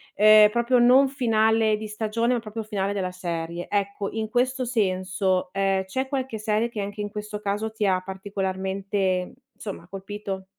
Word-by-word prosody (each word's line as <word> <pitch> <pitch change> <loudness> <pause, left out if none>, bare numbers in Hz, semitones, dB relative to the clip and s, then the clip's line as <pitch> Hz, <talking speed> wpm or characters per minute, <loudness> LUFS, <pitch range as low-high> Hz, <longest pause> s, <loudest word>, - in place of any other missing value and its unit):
ehm, 215 0 +8
proprio 240 +3 +2
non 255 +3 +6
finale 220 -4 +2
di 215 0 -6
stagione, 225 +3 -1
ma 245 - +1
proprio 220 0 -6
finale 205 -2 -2
della 185 -2 -2
serie. 170 -1 -4
Ecco, 200 0 -1
in 220 -1 -3
questo 255 +2 0
senso, 185 -4 0
ehm, 195 -1 +1
c'è 260 +8 -2
qualche 265 -5 -3
serie 215 +2 0
che 215 -3 -4
anche 205 +1 -5
in 205 - -3
questo 210 0 -5
caso 210 +2 -2
ti 215 -1 -2
ha 185 -2 +2
particolarmente, 190 -1 -2 0.2
insomma, 195 -4 -8
colpito? 195 0 -6
210 Hz, 165 wpm, -25 LUFS, 190-220 Hz, 0.2 s, ehm